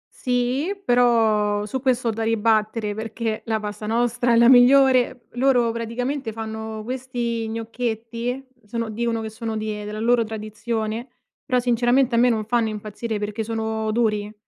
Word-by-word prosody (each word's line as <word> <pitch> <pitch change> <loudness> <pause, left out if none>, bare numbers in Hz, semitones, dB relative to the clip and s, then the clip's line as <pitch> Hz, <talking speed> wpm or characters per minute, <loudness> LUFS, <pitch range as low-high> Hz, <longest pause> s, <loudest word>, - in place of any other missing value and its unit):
Sì, 250 +8 0
però 220 - +3
su 250 +5 -4
questo 255 -2 +1
ho - - +3
da 225 +1 -3
ribattere 220 -1 +1
perché 220 0 -3
la 220 -1 0
pasta 210 0 -6
nostra 240 +2 +1
è - - +5
la 235 +1 +6
migliore. 255 -1 +5
Loro 245 -2 +3
praticamente 235 +3 -3
fanno 220 0 -6
questi 240 -2 -3
gnocchetti, 230 +2 -3 0.2
sono 230 +1 -3
dicono 230 +1 -1
che 220 - -4
sono 220 0 -5
di 215 -1 -4
della 210 +1 -5
loro 235 +1 +3
tradizione, 220 +1 -4 0.4
però 255 -3 +2
sinceramente 245 +1 +2
a - - +3
me 245 +1 +5
non 220 -2 0
fanno 230 0 +1
impazzire 215 +1 -4
perché 210 +2 -3
sono 220 0 -2
duri. 215 -2 0
230 Hz, 155 wpm, -23 LUFS, 220-245 Hz, 0.4 s, la